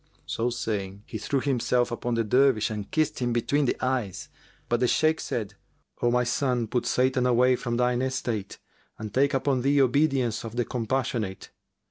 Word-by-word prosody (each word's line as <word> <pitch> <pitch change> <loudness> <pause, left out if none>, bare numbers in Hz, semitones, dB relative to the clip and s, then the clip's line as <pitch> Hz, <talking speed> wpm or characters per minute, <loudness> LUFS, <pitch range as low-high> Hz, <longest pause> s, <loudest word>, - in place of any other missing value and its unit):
So 115 +2 -1
saying, 100 -4 -4
he 110 - -6
threw 135 +6 -1
himself 125 -3 +1
upon 120 0 -2
the 115 - +1
Dervish 125 -1 +3
and 105 -2 -5
kissed 155 -2 0
him 120 -2 0
between 140 +5 +1
the - - 0
eyes; 125 -8 -2 0.4
but 120 - +1
the 125 - +2
Shaykh 155 +5 +2
said, 105 -3 -3 0.5
"O 120 - +3
my 125 +1 +2
son, 125 -1 0
put 120 +3 -2
Satan 125 0 +2
away 125 +1 +4
from 120 -1 -3
thine 125 0 +1
estate 120 -6 -3 0.4
and 110 -1 -7
take 140 +2 +2
upon 135 -1 +1
thee 140 +2 +3
obedience 130 -3 +2
of 115 0 -7
the 120 -1 0
Compassionate." 115 -5 -2
125 Hz, 175 wpm, -26 LUFS, 115-130 Hz, 0.5 s, away